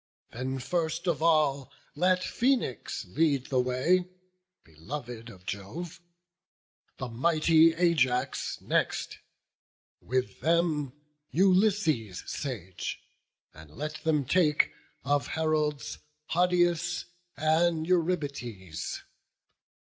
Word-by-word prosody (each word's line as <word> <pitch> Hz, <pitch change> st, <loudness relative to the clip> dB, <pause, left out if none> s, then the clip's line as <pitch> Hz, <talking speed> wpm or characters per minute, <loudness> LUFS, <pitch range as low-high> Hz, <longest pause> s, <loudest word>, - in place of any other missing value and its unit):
Then 130 Hz, +2 st, -3 dB
first 160 Hz, +6 st, -2 dB
of 170 Hz, -4 st, 0 dB
all 150 Hz, -5 st, +2 dB, 0.2 s
let 180 Hz, +3 st, +2 dB
Phoenix 240 Hz, -, 0 dB
lead 140 Hz, -, +1 dB
the 130 Hz, -, +3 dB
way, 130 Hz, +9 st, +2 dB, 0.6 s
Beloved 115 Hz, -, -8 dB
of 95 Hz, -5 st, -14 dB
Jove; 160 Hz, -, -6 dB, 1.0 s
the 135 Hz, -, -4 dB
mighty 160 Hz, +5 st, +4 dB
Ajax 155 Hz, -8 st, +1 dB
next: -, -, -1 dB, 0.8 s
With 130 Hz, +1 st, -2 dB
them, 160 Hz, -5 st, +1 dB, 0.4 s
Ulysses 180 Hz, -, +2 dB
sage; 100 Hz, -, -5 dB, 0.5 s
and 80 Hz, 0 st, -13 dB
let 155 Hz, +1 st, -5 dB
them 150 Hz, -3 st, +2 dB
take, 150 Hz, 0 st, +3 dB, 0.3 s
Of 140 Hz, -1 st, +1 dB
heralds, 155 Hz, -2 st, -1 dB, 0.3 s
Hodius 175 Hz, -1 st, +2 dB, 0.3 s
and 160 Hz, +1 st, +2 dB
Eurybates. 140 Hz, -, -2 dB
155 Hz, 90 wpm, -29 LUFS, 125-170 Hz, 1.0 s, mighty